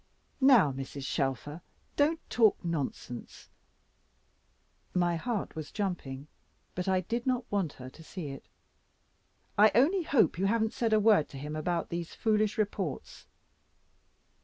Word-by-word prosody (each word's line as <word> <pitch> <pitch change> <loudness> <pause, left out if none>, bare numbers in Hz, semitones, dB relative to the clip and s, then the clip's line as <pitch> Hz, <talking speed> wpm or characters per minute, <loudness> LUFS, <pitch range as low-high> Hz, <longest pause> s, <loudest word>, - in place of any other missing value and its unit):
"Now, 240 - +7
Mrs. 135 +1 -6
Shelfer, 140 +4 -2 0.3
don't 310 +3 +2
talk 225 -4 +4
nonsense," 145 -6 -5 1.4
my 175 -1 +2
heart 215 +4 -3
was 155 -2 -6
jumping, 160 -10 -3 0.5
but 180 +1 -4
I 190 -1 +2
did 235 +6 -3
not 250 -1 +1
want 195 -7 0
her 125 - -10
to 160 - -14
see 160 -2 -6
it. 135 - -9 1.1
"I 215 +1 +8
only 320 - +4
hope 270 - +2
you 195 - +2
haven't 220 +1 +1
said 230 -2 0
a 215 - +5
word 210 -7 +4
to 135 - -9
him 150 +3 -5
about 170 +2 -1
these 170 -1 -5
foolish 215 0 +1
reports." 200 -7 -3
185 Hz, 135 wpm, -30 LUFS, 150-220 Hz, 1.4 s, I